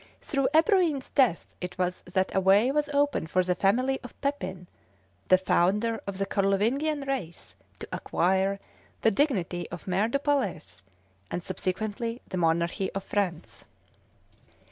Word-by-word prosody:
Through 275 -3 0
Ebroin's 325 - +3
death 250 -11 +3 0.2
it 180 0 -5
was 180 0 -1
that 190 0 0
a - - +3
way 200 +6 +4
was 295 0 0
opened 285 - +1
for 185 +3 +2
the 180 0 +1
family 250 +9 +1
of 245 - -12
Pepin, 190 -11 -3 0.6
the 185 - +6
founder 200 +5 +1
of 200 -1 -4
the 195 - 0
Carlovingian 230 +11 +1
race, 265 -12 -5 0.2
to - - -8
acquire 190 +2 +1 0.4
the 225 - +5
dignity 195 - 0
of 175 - -9
Maire 190 +4 +2
du 235 - +1
Palais, 275 - 0 0.7
and 175 - -4
subsequently 215 +6 -3
the 185 - -4
monarchy 170 +3 +1
of 195 - -3
France. 180 -6 -3
200 Hz, 145 wpm, -27 LUFS, 185-270 Hz, 0.7 s, the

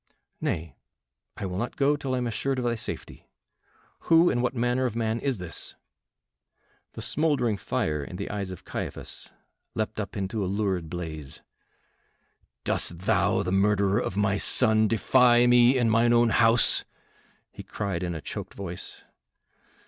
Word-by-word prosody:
"Nay, 80 0 -3 0.6
I - - -4
will 90 0 -3
not 120 - -3
go 145 +1 +3
till 135 -3 -3
I - - -1
am 125 - -1
assured 125 +4 -1
of 125 - -2
thy 120 - +1
safety. 115 - -7 0.8
Who, 165 +1 +5
and 120 - 0
what 125 +1 -1
manner 120 +2 +1
of 120 -3 -2
man 115 0 -1
is 135 -2 -1
this?" 90 -3 -6 1.2
The - - -7
smouldering 145 -8 +1
fire 75 -5 -2
in 90 - -8
the - - -4
eyes 100 -2 -3
of 95 - -9
Caiaphas - - -6 0.5
leapt 110 0 -2
up 105 +1 -5
into 100 +2 -2
a - - -1
lurid 95 -5 -1
blaze. 80 -5 -6 1.2
"Dost 85 - -2
thou, - - +2
the 90 - -2
murderer 100 +1 +2
of 100 - -3
my 100 -1 +1
son, 110 0 +3
defy 120 +2 +4
me 120 +1 +5
in 120 -2 +2
mine 115 +2 +4
own 120 0 +4
house?" 115 +1 +4 0.7
he - - -9
cried 100 -5 -4
in 85 -1 -3
a 80 - -5
choked - - -7
voice. 90 -3 -7
110 Hz, 160 wpm, -26 LUFS, 95-120 Hz, 1.2 s, Who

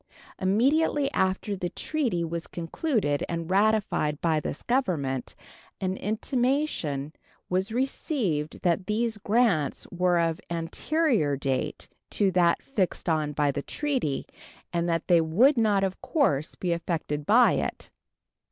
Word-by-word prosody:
Immediately 275 +9 +2
after 190 +2 0
the 180 -2 -3
treaty 240 - -1
was 170 0 -4
concluded 170 - -1
and 170 +1 -3
ratified 200 -7 +2
by 160 -2 +1
this 150 - -5
Government 165 - -1 0.4
an 185 0 -1
intimation 220 - -1 0.4
was 190 +4 0
received 230 - -1
that 180 +1 +1
these 220 0 -1
grants 205 - +1
were 180 0 +2
of 165 -1 0
anterior 170 - 0
date 130 -1 -2 0.2
to 195 -2 +2
that 175 -2 +3
fixed 200 -11 -2
on 155 -3 +1
by 145 -1 +2
the 140 - -3
treaty 260 - -2 0.5
and 170 0 0
that 165 0 -1
they 175 -2 +5
would 215 - +4
not, 210 -4 +2
of 190 -1 -2
course, 170 - 0
be 180 - -2
affected 160 -3 -3
by 240 +3 +6
it. - - -3
185 Hz, 130 wpm, -27 LUFS, 160-235 Hz, 0.5 s, by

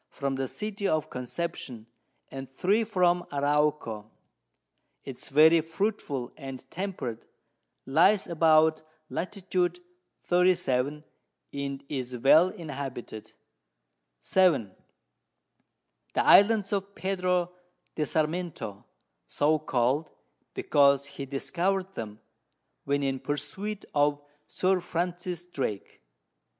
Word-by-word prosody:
from 140 -1 -3
the 135 0 -2
City 210 - -3
of 155 -1 0
Conception, 125 -3 -5 0.5
and 135 -1 -7
3 195 +11 +1
from 180 -4 +2
Arauco: 145 -7 0 0.9
It 135 -2 -8
is - - -8
very 160 +4 +6
fruitful 160 - -2
and 135 -3 -8
temperate, 170 - -5 0.6
lies 175 +9 +4
about 160 -1 +4 0.3
Lat. 195 +4 -4 0.9
37, 150 -6 +2 0.5
and 140 -1 -4
is 125 -3 -4
well 155 +8 +6
inhabited. 140 - -7 0.9
7. 170 - +2 1.4
The - - +2
Islands 205 -1 +6
of 200 0 -2
Pedro 180 -2 0 0.4
de 155 - -1
Sarmiento, 155 - -2 0.4
so 155 +2 +2
call'd, 135 +2 0 0.5
because 140 -1 +4
he 140 0 -8
discover'd 185 +7 -1
them, 110 - -7 0.7
when 140 0 0
in 135 -1 -1
Pursuit 150 +10 -4
of 145 0 +2 0.3
Sir 185 0 +1
Francis 175 0 -3
Drake. 130 - -5
155 Hz, 95 wpm, -28 LUFS, 135-180 Hz, 1.4 s, very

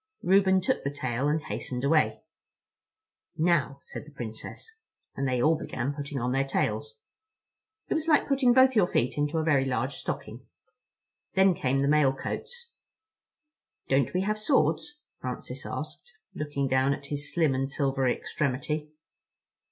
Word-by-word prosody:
Reuben 190 0 +4
took 180 - 0
the 140 - 0
tail 130 -2 -2
and 150 +2 +2
hastened 125 0 -4
away. 155 +2 +2 1.1
"Now," 155 -5 +2
said - - -8
the 150 - -14
Princess. 125 - -8 0.4
And 135 0 -1
they 125 -1 0
all 155 +6 +4
began 135 -3 -3
putting 145 -1 -5
on 125 +1 -1
their 135 +1 +2
tails. 450 - -2 0.9
It - - 0
was 320 0 -1
like 300 -3 +4
putting 270 -3 +3
both 260 +1 +5
your 200 -5 +5
feet 125 -3 0
into 145 +2 0
a 160 - +1
very 145 -4 +3
large 130 -1 -1
stocking. - - -6 0.9
Then 190 0 +5
came 135 -3 0
the - - +2
mail 145 -2 +4
coats. 475 - -6 1.2
"Don't 135 -2 +2
we 185 - +2
have 215 +2 -1
swords?" 295 +4 +1 0.2
Francis - - -6
asked, 485 - -7 0.2
looking 145 -2 -2
down 130 +1 +2
at 140 - -12
his 145 0 -3
slim 160 -5 +2
and 135 +1 -1
silvery 135 -2 +1
extremity. 150 +2 -2
145 Hz, 150 wpm, -28 LUFS, 135-190 Hz, 1.2 s, both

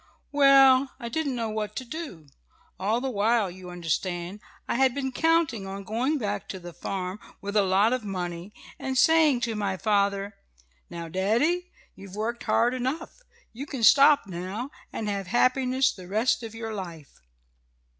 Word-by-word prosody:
"Well, 275 -2 +6
I 235 -3 -5
didn't 285 0 -2
know 230 -2 -2
what 215 -1 -4
to 260 - -4
do. 245 - -7 0.5
All 215 +5 +1
the 265 0 -2
while, 215 -2 +1
you 180 0 -11
understand, 175 +2 -3 0.3
I - - 0
had 260 0 +2
been 265 -2 -2
counting 315 -9 +1
on 195 +1 -6
going 245 +9 0
back 205 -5 -3
to 190 - -5
the 175 -1 -10
farm, 185 +2 -4 0.2
with 200 +1 -6
a 210 - +5
lot 195 +4 +3
of 255 -2 -2
money, 180 -1 -5 0.3
and 265 -1 -3
saying 310 -3 +4
to 230 -1 -1
my 200 -3 -2
father: 200 0 0 0.6
'Now, 170 -1 -6
daddy, 235 - +1 0.2
you've 195 0 -12
worked 230 +3 -3
hard 240 +2 +2
enough. 260 +6 -3 0.4
You 270 +5 -7
can 265 -5 -5
stop 280 +5 +7
now, 195 +8 -5 0.2
and 215 - -4
have 200 -2 -3
happiness 255 +4 +2
the 185 -2 -11
rest 220 +6 +1
of 225 -1 -8
your 225 -1 -5
life.' 170 -8 -8
220 Hz, 165 wpm, -26 LUFS, 195-260 Hz, 0.6 s, stop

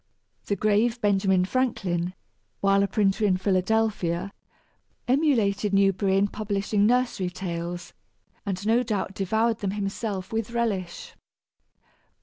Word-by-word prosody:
The 200 - +1
grave 215 +4 +1
Benjamin 195 -3 +2
Franklin, 185 -7 -1 0.4
while 195 0 +3
a 200 - +2
printer 205 +1 +1
in 190 -3 +3
Philadelphia, 195 -1 0 0.7
emulated 225 -8 +2
Newberry 195 0 +3
in 200 +1 +3
publishing 205 0 0
nursery 240 -6 +1
tales, 175 -1 -5 0.5
and 195 0 -4
no 230 +3 +3
doubt 210 -5 -2
devoured 220 +4 0
them 200 - -2
himself 200 0 -4
with 225 0 -1
relish. 215 -7 -3
200 Hz, 115 wpm, -26 LUFS, 190-220 Hz, 0.7 s, while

